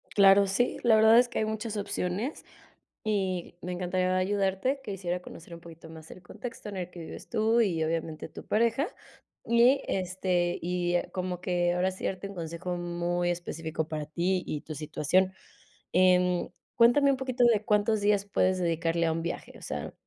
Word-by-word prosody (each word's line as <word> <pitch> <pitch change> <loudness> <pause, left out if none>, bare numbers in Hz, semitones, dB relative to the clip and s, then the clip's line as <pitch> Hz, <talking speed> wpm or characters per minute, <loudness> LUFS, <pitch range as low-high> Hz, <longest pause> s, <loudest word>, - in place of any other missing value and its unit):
Claro, 200 0 +6
sí, 220 +6 0
la 230 -2 +5
verdad 220 +1 +7
es 245 - +4
que - - -3
hay 215 - +1
muchas 220 0 -4
opciones. 200 - -3 0.6
Y 190 -5 -2
me 180 - -5
encantaría 185 +1 0
ayudarte. 195 +7 0
Quisiera 180 -4 -3
conocer 170 -1 -11
un 170 - -9
poquito 165 -1 -13
más 160 -1 -12
el 185 - -12
contexto 225 +3 -8
en 195 - -6
el 180 -1 -4
que 175 - -11
vives 160 - -9
tú 225 +2 +2
y 170 -7 +1
obviamente 160 -1 -3
tu - - -11
pareja, 235 +7 +2 0.6
y, 240 +4 +5
este, 180 -1 0
y 175 0 -1 0.2
como 180 -1 -3
que, 175 -1 0
ahora 185 +1 +1
sí, 185 - -11
darte 190 +1 -3
un 200 - -9
consejo 170 +2 -4
muy 175 0 -1
específico 165 -2 -3
para 155 -2 -4
ti 180 +3 0
y 150 - -4
tu 155 - -7
situación. 155 +5 0 0.6
Em, 180 -1 +3 0.3
cuéntame 275 +4 +5
un 270 - 0
poquito 255 -1 0
de, 220 -3 +3
¿cuántos 210 +1 +2
días 205 -1 +2
puedes 185 -2 +1
dedicarle 170 -1 0
a 160 - +2
un 165 - -2
viaje? 170 - -5
O - - -19
sea, - - -5
185 Hz, 180 wpm, -28 LUFS, 175-210 Hz, 0.6 s, verdad